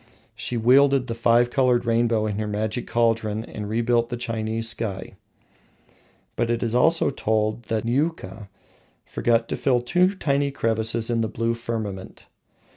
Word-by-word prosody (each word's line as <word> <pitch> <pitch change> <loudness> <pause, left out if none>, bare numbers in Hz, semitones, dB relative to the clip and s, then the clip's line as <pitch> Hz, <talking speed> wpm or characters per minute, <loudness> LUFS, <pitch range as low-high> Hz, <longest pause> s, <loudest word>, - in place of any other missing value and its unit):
She 120 - -4
welded 135 +3 +4
the 120 - -4
five 120 +1 +2
coloured 125 -2 +2
rainbow 115 -1 +1
in 105 -1 -2
her 110 - -2
magic 105 +3 -3
cauldron 115 -2 0
and 105 -3 -7
rebuilt 115 +1 +1
the 120 - -4
Chinese 115 -1 -3
sky. 110 -4 -4 1.2
But 120 0 -1
it 120 0 0
is 115 - -1 0.5
told 110 +1 0
that 110 0 -2
Niuka 120 - -2 0.6
forgot 115 -1 0
to - - -1
fill 125 -3 +1
two 180 +10 +1
tiny 140 -5 0
crevices 115 -3 -1
in 115 -1 +1
the 110 - 0
blue 115 +1 -1
firmament. 110 -5 -6
115 Hz, 145 wpm, -23 LUFS, 110-120 Hz, 1.2 s, welded